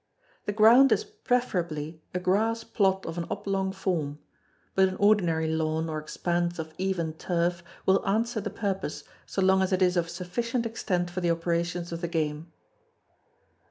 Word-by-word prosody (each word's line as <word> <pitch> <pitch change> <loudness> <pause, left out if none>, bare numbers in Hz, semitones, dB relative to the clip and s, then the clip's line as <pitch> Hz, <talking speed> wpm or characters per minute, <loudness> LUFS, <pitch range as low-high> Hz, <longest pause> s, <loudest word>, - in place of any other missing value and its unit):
The - - +1
ground 230 +6 +7
is - - +3
preferably 180 - -2
a - - -2
grass 220 +5 +1
plot 190 -2 +1
of 165 +1 -4
an 170 - -3
oblong 195 -1 -1
form; 170 -7 -2 0.6
but 190 0 +4
an 185 - -5
ordinary 180 -6 +3
lawn 160 0 0
or 155 - -2
expanse 175 +3 -1
of 160 -1 -6
even 180 -4 -1
turf 170 +1 -1 0.2
will 190 0 +4
answer 225 +2 +1
the 205 - -3
purpose, 195 -6 -3 0.2
so 195 - -1
long 190 0 +4
as 190 - +1
it 185 0 +3
is 180 0 +3
of 170 -1 +1
sufficient 230 +8 -2
extent 180 -6 -1
for 185 +1 -3
the 175 - +1
operations 170 +1 -1
of 170 0 -4
the 170 - -1
game. 160 0 -2
180 Hz, 165 wpm, -27 LUFS, 165-200 Hz, 0.6 s, ground